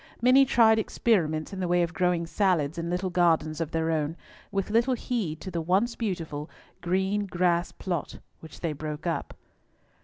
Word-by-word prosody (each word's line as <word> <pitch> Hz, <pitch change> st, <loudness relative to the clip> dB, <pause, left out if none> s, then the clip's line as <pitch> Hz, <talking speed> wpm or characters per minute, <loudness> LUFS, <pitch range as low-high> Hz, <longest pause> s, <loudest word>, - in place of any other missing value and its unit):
Many 255 Hz, +3 st, +6 dB
tried 225 Hz, -3 st, +5 dB
experiments 170 Hz, -8 st, 0 dB
in 190 Hz, -, -5 dB
the 185 Hz, -, -1 dB
way 175 Hz, 0 st, +3 dB
of 170 Hz, 0 st, -3 dB
growing 180 Hz, -2 st, +1 dB
salads 170 Hz, -4 st, +1 dB
in 170 Hz, 0 st, -3 dB
little 180 Hz, +1 st, -1 dB
gardens 165 Hz, -3 st, +2 dB
of 160 Hz, -, -2 dB
their 165 Hz, 0 st, 0 dB
own, 155 Hz, +1 st, -1 dB, 0.3 s
with 195 Hz, 0 st, -2 dB
little 235 Hz, +4 st, +3 dB
heed 220 Hz, -11 st, -3 dB
to 190 Hz, -, -6 dB
the 170 Hz, -, -2 dB
once 195 Hz, +8 st, +1 dB
beautiful 165 Hz, -8 st, -4 dB, 0.3 s
green 190 Hz, +3 st, 0 dB
grass 175 Hz, -1 st, +1 dB
plot 175 Hz, -5 st, -4 dB, 0.2 s
which 160 Hz, -2 st, -13 dB
they 165 Hz, -3 st, -1 dB
broke 150 Hz, +2 st, -6 dB
up. 170 Hz, -2 st, -3 dB
175 Hz, 175 wpm, -27 LUFS, 160-200 Hz, 0.3 s, Many